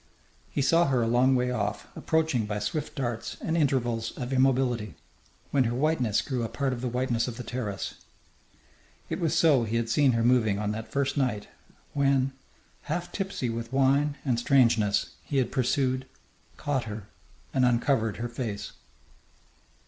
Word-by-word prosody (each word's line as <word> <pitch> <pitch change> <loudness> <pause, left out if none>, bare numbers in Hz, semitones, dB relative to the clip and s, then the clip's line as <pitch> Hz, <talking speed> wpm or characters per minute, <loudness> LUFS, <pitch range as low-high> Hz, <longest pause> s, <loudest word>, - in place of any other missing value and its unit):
He 140 - -1
saw 165 +4 +4
her 130 -3 +2
a - - +1
long 125 +3 +4
way 125 0 +1
off, 105 -3 -2
approaching 155 -9 0
by 105 0 -2
swift 105 +9 -3
darts 120 -4 -3
and 160 - -2
intervals 120 -7 0
of 125 +1 -4
immobility, 130 -4 +2 0.6
when 135 -3 +3
her 120 +1 -1
whiteness 130 -6 +1
grew 130 -3 -2
a 115 - -2
part 130 +3 -1
of 120 - -5
the 125 - -1
whiteness 125 -1 0
of 120 -2 -5
the 125 - -5
terrace. 110 -5 -4 1.2
It - - -1
was 165 -1 +1
so 150 -7 +5
he 115 0 -2
had 115 -1 0
seen 135 +1 +4
her 115 0 +1
moving 115 -4 +3
on 105 0 -1
that 110 +1 -5
first 140 +1 0
night 125 -7 -1 0.4
when, 135 -1 +2 0.6
half 175 +3 -2
tipsy 190 - -2
with 115 +1 -5
wine 140 +2 +2
and 125 -4 +1
strangeness, 115 -5 +3
he 140 - -2
had 130 - +1
pursued, 130 0 0 0.5
caught 135 -4 -1
her, 105 -1 -6 0.5
and 130 - +2
uncovered 120 -2 +2
her 120 - -3
face. 110 -4 -5
125 Hz, 165 wpm, -27 LUFS, 115-140 Hz, 1.2 s, so